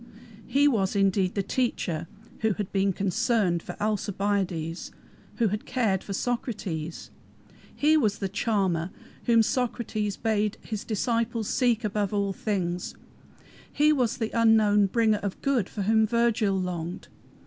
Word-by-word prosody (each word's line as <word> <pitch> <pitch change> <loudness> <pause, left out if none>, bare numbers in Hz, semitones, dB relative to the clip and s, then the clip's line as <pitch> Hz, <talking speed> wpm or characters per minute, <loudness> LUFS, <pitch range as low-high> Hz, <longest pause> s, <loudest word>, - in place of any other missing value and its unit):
He 285 +2 +4
was 205 -8 +1
indeed 195 -2 +2
the 200 - 0
"Teacher" 180 -8 -1 0.3
who 220 -1 +2
had 205 -1 -4
been 195 0 +2
"concerned" 195 -2 +1
for - - -8
Alcibiades, 195 -5 -1 0.5
who 230 -3 +2
had 210 +2 -4
cared 220 -7 0
for - - -8
Socrates. 195 - -3 0.6
He 305 +2 +4
was 215 -9 +1
the 195 - -2
"Charmer" 190 -4 0 0.4
whom 230 -1 +5
Socrates 220 -4 -1
bade 215 -1 0
his 215 -3 -5
disciples 230 0 -1
seek 240 -3 +1
above 210 -1 -1
all 200 -1 0
things. 180 -4 -2 0.8
He 300 +1 +4
was 250 -4 0
the 225 -2 -2
unknown 215 -3 +4
bringer 220 0 +2
of 200 -2 -4
good 255 -8 +1
for 205 - -4
whom 220 +2 +3
Virgil 225 -4 +2
longed. 175 -1 -4
210 Hz, 135 wpm, -27 LUFS, 195-230 Hz, 0.8 s, whom